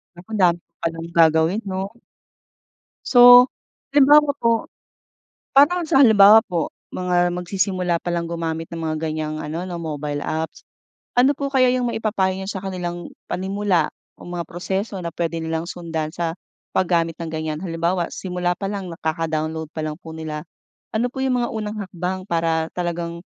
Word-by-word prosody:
Naku, 175 +4 -15
andami 180 -4 +3
ko - - -79
palang 165 0 -3
gagawin, 160 +6 +4
'no? 190 0 -2 1.2
So, 245 0 +9 0.5
halimbawa 290 +1 +6
po 230 -1 +1 0.9
parang 345 +6 +6
sa 270 - +4
halimbawa 215 -1 +8
po, 170 -3 -2 0.2
mga 175 -1 +1
magsisimula 180 -1 -1
palang 170 -1 -2
gumamit 165 -1 -3
ng 170 - -6
mga 155 -1 -2
ganyang 155 0 -3
ano, 160 +4 -4
na 180 - -6
mobile 150 -2 -4
apps. 160 +1 -3 0.6
Ano 265 +3 +6
po 280 -1 -2
kaya 255 -1 +5
yung 250 -1 0
maipapayo 205 -4 0
niyo 190 - -5
sa 190 -1 -5
kanilang 175 -2 -5 0.2
panimula 190 -3 0 0.3
o - - -11
mga 175 -1 -4
proseso 190 +3 -3
na 170 - -3
pwede 165 -1 -2
nilang 160 +1 -2
sundan 160 -3 -4
sa 165 -1 -2 0.4
paggamit 170 -2 +1
ng 165 -1 -4
ganyan. 155 -1 -3
Halimbawa, 170 0 -1
simula 180 -1 -2
palang 195 -1 -4
na 165 - -7
kaka-download 160 0 -2
pa 155 - -3
lang 155 -1 -4
po 160 - -10
nila, 155 0 -5 0.5
ano 240 +3 +1
po - - -8
yung 250 -2 +1
mga - - -2
unang 215 -1 -4
hakbang 185 +1 -4
para 165 -1 0
talagang 170 -1 -3
175 Hz, 155 wpm, -22 LUFS, 165-195 Hz, 1.2 s, So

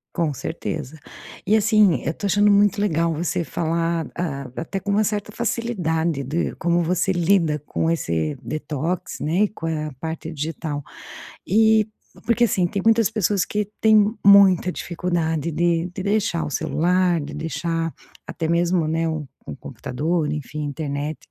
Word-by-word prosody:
Com 160 -4 0
certeza. 155 0 -5 0.5
E, 215 +3 +4
assim, 215 -4 +4
eu - - 0
estou 200 +5 -4
achando 205 +2 +4
muito 205 0 +4
legal 170 -5 +1
você 170 +2 -1
falar, 165 0 -1
ah, 140 -6 -3
até 180 +4 -4
com 195 +2 -6
uma 210 +2 +3
certa 210 -1 -2
facilidade 170 - -1
de 150 +6 -2
como 175 +1 +1
você 180 +3 +1
lida 170 -4 +2
com 165 +2 0
esse 80 - -1
detox, 155 +3 -3
né, 160 +5 0
e - - +3
com 170 - -8
a 155 -1 -2
parte 160 +1 -5
digital, 155 -1 -4 0.7
e 220 +2 +4 0.4
porque, 235 0 +3
assim, 185 -6 +2
tem 200 - -3
muitas 225 -1 +4
pessoas 205 -3 +1
que 210 0 -2 0.2
têm 215 -1 +5
muita 195 -3 +7
dificuldade 170 -3 -2
de 170 +1 +1
de 190 - -5
deixar 200 -5 0
o - - -4
celular, 175 +4 +1
de 145 +1 -7
deixar 165 +2 -2 0.3
até 160 - -4
mesmo, 170 0 +2
né, 165 +1 0
um 155 -3 -3 0.2
um - - -6
computador, 150 +6 -2
enfim, 150 0 -5
a 145 - -2
internet. 145 0 -3
170 Hz, 160 wpm, -22 LUFS, 155-200 Hz, 0.7 s, muita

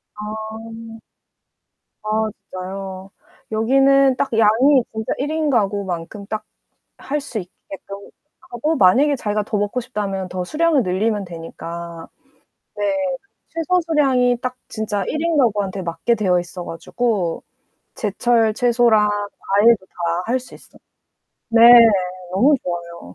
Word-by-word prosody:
아 220 +1 -8 1.0
아 - - -5 0.4
진짜요. 190 +1 -7 0.4
여기는 270 +4 +4
딱 270 - -1
양이 240 +5 +5
진짜 220 0 -3
1인 305 +2 -1
가구만큼 200 -4 -2
딱 215 0 -4 0.5
할 290 +2 -3
수 265 -6 -5
있게끔 195 +1 -10 0.5
하고 300 +7 -1
만약에 270 +9 +4
자기가 210 -1 -1
더 210 +1 -2
먹고 205 +5 -1
싶다면 200 -6 -4
더 180 -1 -4
수량을 310 - +2
늘리면 205 +2 -1
되니까. 170 0 -8 0.7
네, 205 - -4 0.7
최소 360 +2 0
수량이 260 -6 +2
딱 255 0 -3
진짜 210 -3 -3
일인가구한테 235 - 0
맞게 175 +7 -1
되어있어가지고 180 +1 -2 0.5
제철 225 +1 +1
채소랑 230 -3 +3
과일도 205 +1 +1
다 170 0 -2
할 250 +3 +1
수 255 - -14
있어요. - - -16 0.7
네, 230 0 +4 0.7
너무 260 +11 +4
좋아요. 170 - -6
215 Hz, 240 characters per minute, -20 LUFS, 190-250 Hz, 1.0 s, 양이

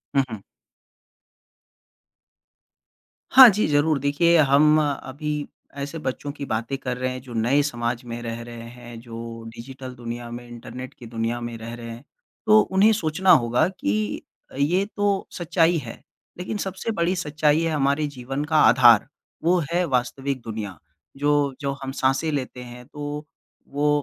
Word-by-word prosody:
हुँ, 135 - +5
हुँ। 110 - -6 2.9
हाँ 260 -1 +11
जी, 210 +1 +1
ज़रूर 145 0 +2
देखिए 155 +5 +3
हम 150 +3 +5
अभी 145 0 -4 0.5
ऐसे 145 +4 -5
बच्चों 140 +2 -3
की 140 - -4
बातें 115 +4 -2
कर 125 -2 -4
रहे 130 0 -1
हैं, 130 0 -6
जो 125 -2 -11
नए 120 +6 +2
समाज 120 -3 -2
में 120 0 -6
रह 115 0 -5
रहे 120 -1 -9
हैं, 120 -1 -11
जो 115 -1 -8
डिजिटल 130 +2 -9
दुनिया 120 0 -6
में, 120 0 -8
इंटरनेट 120 +2 -9
की 120 - -13
दुनिया 115 +1 -2
में 120 -1 -5
रह 115 +1 -8
रहे 115 -1 -8
हैं। 115 +3 -10 0.4
तो 215 0 +7
उन्हें 200 +2 +4
सोचना 185 -1 +2
होगा 120 +6 +4
कि 105 - -2 0.4
ये 180 +7 +2
तो 205 -2 0
सच्चाई 170 0 +2
है, 115 - -8 0.4
लेकिन 180 +4 -4
सबसे 190 +4 -4
बड़ी 180 -2 0
सच्चाई 155 -2 +1
है 165 -1 0
हमारे 145 0 +1
जीवन 135 +1 -5
का 155 0 +1
आधार। 120 -1 +6 0.4
वो 180 +2 +4
है 180 +1 +2
वास्तविक 135 0 -1
दुनिया, 110 -5 -6 0.4
जो 145 -1 +1
जो 140 0 -1
हम 135 - -4
साँसें 135 +4 0
लेते 130 -3 -4
हैं 125 0 -11
तो 150 +1 -6 0.4
वो 145 +1 0
135 Hz, 155 wpm, -24 LUFS, 120-155 Hz, 2.9 s, हाँ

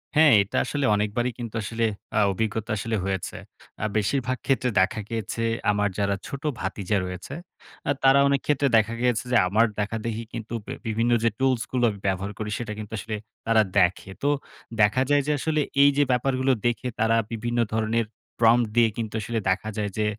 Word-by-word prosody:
হ্যাঁ 150 -4 +7
এটা 100 - -3
আসলে 145 -2 -1
অনেকবারই 105 +4 0
কিন্তু 115 -2 -6
আসলে 115 +2 -1 0.3
আ - - +5
অভিজ্ঞতা 110 +2 -2
আসলে 110 +2 -2
হয়েছে। 95 -2 -3 0.5
আ - - +1
বেশিরভাগ 130 +4 0
ক্ষেত্রে 130 -2 +1
দেখা 95 +3 +1
গিয়েছে 115 0 -3 0.3
আমার 105 0 +1
যারা 100 0 +1
ছোট 140 0 -7 0.2
ভাতিজা 100 +1 -1
রয়েছে, 90 +8 -7 0.6
আ - - +5
তারা 135 +1 +6
অনেকক্ষেত্রে 140 0 +1
দেখা 110 +1 +2
গিয়েছে 125 -1 +1
যে, 120 - +5
আমার 110 +5 +4
দেখাদেখি 110 +2 -3 0.4
বে 130 - -5
বিভিন্ন 115 +2 +1
যে 115 - +4
টুলসগুলো 125 -2 0
আমি 100 -2 -6
ব্যবহার 95 +1 -1
করি, 105 -1 -3
সেটা 110 -3 -4
কিন্তু 105 0 -8
আসলে 110 +2 -4 0.3
তারা 115 -1 +5 0.2
দেখে। 95 +1 +1
তো - - +2 0.5
দেখা 105 +5 +4
যায় 145 0 +4
যে - - +2
আসলে, 155 +1 0 0.2
এইযে 145 0 +5
ব্যাপারগুলো 130 +1 +1 0.2
দেখে 120 +1 -1
তারা 110 +1 +3 0.2
বিভিন্ন 120 +1 -2
ধরনের 110 +1 +1 0.3
prompt 115 +1 +5
দিয়ে 120 -1 +5
কিন্তু 110 -2 -4
আসলে 115 +2 -2
দেখা 100 +3 0
যায় 105 -1 -1
যে, 110 - +1
115 Hz, 170 wpm, -25 LUFS, 105-125 Hz, 0.6 s, হ্যাঁ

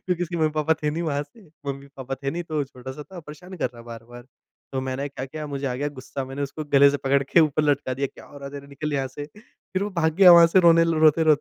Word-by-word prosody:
क्योंकि 180 -1 -1
इसके 175 0 -3
मम्मी-पापा 155 0 +1
थे 150 - +1
नहीं 165 +3 -3
वहाँ 145 -3 -1
से। 170 +6 -19 0.2
मम्मी-पापा 135 -1 -6
थे 135 - -1
नहीं, 175 +4 -4
तो 155 -3 -2
छोटा-सा 130 +2 -9
था, 180 +3 -11
परेशान 165 +5 -11
कर 130 - -1
रहा 120 - -12
बार-बार। 120 +1 -11 0.5
तो 135 - -1
मैंने 130 +2 -3
क्या 135 -2 -6
किया, 155 +3 -7
मुझे 140 -1 -4
आ 125 - -2
गया 140 +3 -2
गुस्सा। 135 +1 -6
मैंने 135 +2 -6
उसको 145 +2 -5
गले 140 0 +7
से 145 - -1
पकड़ 140 0 +1
के 155 - +4
ऊपर 155 -1 +2
लटका 140 -3 0
दिया, 140 +2 -1
"क्या - - -15
हो 145 - -13
रहा 140 - -8
है - - -14
तेरे? 140 0 -8
निकल 145 +2 -5
यहाँ 135 -2 -1
से।" 145 - -8 0.5
फिर 190 +1 -1
वो 205 - -1
भाग 160 -1 +2
गया 185 -2 +9
वहाँ 170 -1 +9
से, 185 - +9
रोने 165 -1 +6
ल 165 0 0
रोते-रोते 155 -1 +5
145 Hz, 270 wpm, -24 LUFS, 135-160 Hz, 0.5 s, गया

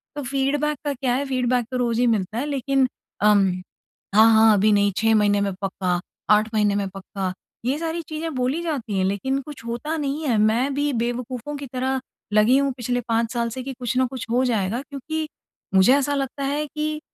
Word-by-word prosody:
तो 290 - -4
फीडबैक 280 +3 0
का 290 - 0
क्या 250 -1 -1
है? 280 +2 -1
फीडबैक 250 -2 +1
तो 255 - -1
रोज़ 240 -2 0
ही 245 - +3
मिलता 215 -1 0
है 265 - -1
लेकिन 275 -2 +1 0.3
अम 205 -1 +5 0.7
हाँ, 220 +1 +7
हाँ, 220 0 +6
अभी 210 +1 +4
नहीं 205 0 +3
6 225 0 +3
महीने 205 -1 +3
में 200 -1 0
पक्का, 185 -2 -1 0.3
8 215 +1 +4
महीने 210 -2 +2
में 200 -1 0
पक्का 190 -1 -5 0.3
ये 265 +4 +1
सारी 330 0 -2
चीजें 315 +1 -4
बोली 255 +6 0
जाती 260 - -2
है - - +2
लेकिन 235 +8 0
कुछ 275 -4 -10
होता 240 +7 -3
नहीं 295 +1 -2
है। 235 -4 +2
मैं 230 +6 +2
भी 290 +1 +1
बेवकूफों 245 +4 -3
की 280 - -6
तरह 260 +1 0 0.3
लगी 215 +5 +5
हूँ 280 0 +2
पिछले 245 0 -1
5 230 0 +1
साल 235 -1 0
से 255 +3 -6
कि 270 +1 -5
कुछ 245 +1 -2
न 260 - +4
कुछ 255 -1 -6
हो 250 +2 +3
जाएगा 225 0 0
क्योंकि 300 +3 -5 0.5
मुझे 190 +7 +6
ऐसा 285 0 +1
लगता 275 0 -3
है 290 +2 -1
कि 305 +1 -3
250 Hz, 205 wpm, -23 LUFS, 220-280 Hz, 0.7 s, हाँ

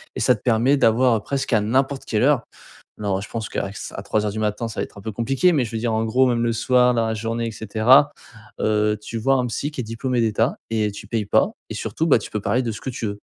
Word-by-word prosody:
et - - -4
ça 125 - +5
te 105 - -15
permet 125 +4 +3
d'avoir 115 -2 +3
presqu'à 135 -3 0
n'importe 135 +5 0
quelle 110 +1 0
heure. 140 -3 +3 0.6
Non, 100 -2 -1
ouais, 95 - -4
je 105 - -8
pense 110 -2 -4
qu'avec 100 +1 -4
ç - - -7
à - - -5
3 105 +1 -1
heures 105 - -2
du 110 - -5
matin, 105 +2 -1
ça 110 - -5
va - - 0
être - - -14
un - - -11
peu 110 +1 -5
compliqué. 135 - +2
Mais, 145 -6 +2
je 110 - -6
veux 115 - -2
dire, 115 0 -1
en 110 0 0
gros, 125 +4 +3
même 120 -2 +1
le 115 - +1
soir, 125 +2 +3
dans 115 -1 +1
la 110 - -1
journée 115 +2 -3
et - - -6
cetera, 110 +7 +4 0.5
heu, 105 0 +1
tu 115 +2 -6
vois 135 +5 +2
un 125 -1 0
psy 125 +5 -3
qui 150 - -6
est - - -8
diplômé 120 +3 -2
d'État 115 +3 +1
et 110 -2 0
tu 105 +1 -10
payes 110 -2 -2
pas - - +2 0.2
et - - -4
surtout, 160 - -2
bah, 140 - +6
tu 105 - -8
peux 105 - -3
parler 125 +5 0
de 115 - -2
ce 105 - -8
que 130 - -4
tu 120 -2 -4
veux. 100 0 -4
115 Hz, 290 wpm, -22 LUFS, 110-125 Hz, 0.6 s, bah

